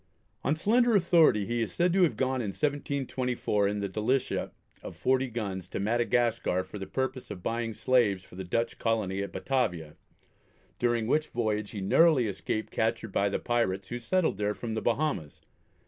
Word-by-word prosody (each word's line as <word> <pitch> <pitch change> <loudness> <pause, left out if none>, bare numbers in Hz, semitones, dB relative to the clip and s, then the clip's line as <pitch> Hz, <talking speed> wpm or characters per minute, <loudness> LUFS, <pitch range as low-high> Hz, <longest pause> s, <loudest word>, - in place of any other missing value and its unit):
On 145 - +2
slender 235 +7 +3
authority 170 - +4
he 120 +1 -1
is 115 - -2
said 175 0 +2
to 190 - +3
have 175 - +3
gone 130 -1 0
in 110 - -3
1724, 130 -4 -1
in 105 0 -2
the 100 - -1
Delicia 110 +7 -1 0.3
of - - -8
40 130 0 +1
guns, 100 -6 -4
to - - -5
Madagascar 115 -2 +1
for 95 +3 -9
the 95 - -6
purpose 130 +1 -3
of 90 - -8
buying 115 +1 -1
slaves 110 -8 +2
for - - -19
the 95 - -5
Dutch 115 +6 -2
Colony 105 -4 0
at 100 -1 -4
Batavia, 90 - -1 0.8
during 120 -2 +1
which 155 +6 +1
voyage 105 -3 -1
he 105 - -6
narrowly 145 - +4
escaped 110 +1 -3
capture 110 0 0
by 100 +1 +1
the - - -1
pirates 100 -5 -1
who 120 - -4
had - - -10
settled 170 +9 +1
there 105 0 -1
from 115 -2 -5
the 110 - -2
Bahamas. 120 - -1
115 Hz, 180 wpm, -29 LUFS, 100-130 Hz, 0.8 s, authority